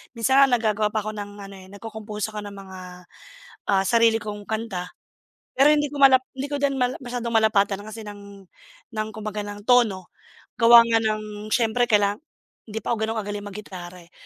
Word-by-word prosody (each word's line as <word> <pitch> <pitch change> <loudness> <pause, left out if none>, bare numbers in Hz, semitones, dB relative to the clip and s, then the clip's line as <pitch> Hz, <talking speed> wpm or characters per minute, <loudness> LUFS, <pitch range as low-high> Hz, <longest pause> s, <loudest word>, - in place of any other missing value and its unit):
Minsan 265 +4 +3
nga - - +9
nagagawa 215 -3 +1
pa 215 - +1
ako 215 - -4
ng 205 0 -6
ano, 195 0 -10
eh, 185 - -14
nagco-compose 215 0 -6
ako 210 - -6
ng 200 - -9
mga, 190 -1 -10 0.9
ah, 195 0 +3
sarili 230 -1 +4
kong 210 -1 -7
kanta. 220 -5 -3 0.7
Pero 275 +3 +6
hindi 295 -1 +3
ko 285 0 -5
malap 265 -1 +7
hindi 270 +2 -5
ko 290 - -2
din 275 -1 +1
mal 250 0 0
masyadong 245 -2 -5
malapatan 210 -3 +3
kasi 215 +1 -8
ng 200 -1 -11 0.5
ng, 215 -1 -2
kumbaga, 215 -1 -4
ng 205 0 -8
tono. 220 -7 +3 0.5
Gawa 235 0 +9
nga 230 -1 +2
ng 215 -1 -3
siyempre 240 0 +2
kailanga 205 -2 +3 0.5
hindi 220 0 -5
pa - - -6
ako 230 - -2
gano’n 225 +1 -2
kagaling 205 0 -6
maggitara, 185 -3 -9
eh. - - -32
215 Hz, 185 wpm, -24 LUFS, 205-235 Hz, 0.9 s, nga